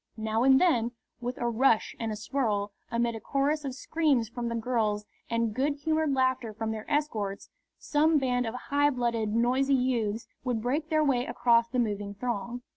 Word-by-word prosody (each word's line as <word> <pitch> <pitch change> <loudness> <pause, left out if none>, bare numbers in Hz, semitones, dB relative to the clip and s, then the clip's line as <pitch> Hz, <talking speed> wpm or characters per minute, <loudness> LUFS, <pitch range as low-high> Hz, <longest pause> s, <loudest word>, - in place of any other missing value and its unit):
Now 220 +1 -1
and 265 +1 +6
then, 240 -10 +2 0.3
with 245 +1 -4
a 240 - -1
rush 235 -1 +2
and 225 -1 -2
a - - -3
swirl, 210 -3 -1 0.2
amid 235 0 0
a 225 - -5
chorus 285 +5 0
of 265 -2 -4
screams 280 -6 +1
from 240 0 -4
the 235 - -2
girls 220 -3 0 0.2
and 230 -2 0
good 280 +5 0
humoured 310 0 0
laughter 260 -4 0
from 220 0 -2
their 220 +3 -6
escorts, 225 -10 -2 0.3
some 310 +1 +2
band 250 -3 0
of 225 - -4
high 285 +3 +1
blooded, 235 -5 -1
noisy 255 +5 +2
youths 235 -4 0 0.2
would 245 -3 -1
break 285 +7 -1
their 310 -1 +3
way 255 -4 +1
across 235 -1 +3
the 250 - -3
moving 205 -3 -1
throng. 240 +2 -4
245 Hz, 185 wpm, -28 LUFS, 225-275 Hz, 0.3 s, and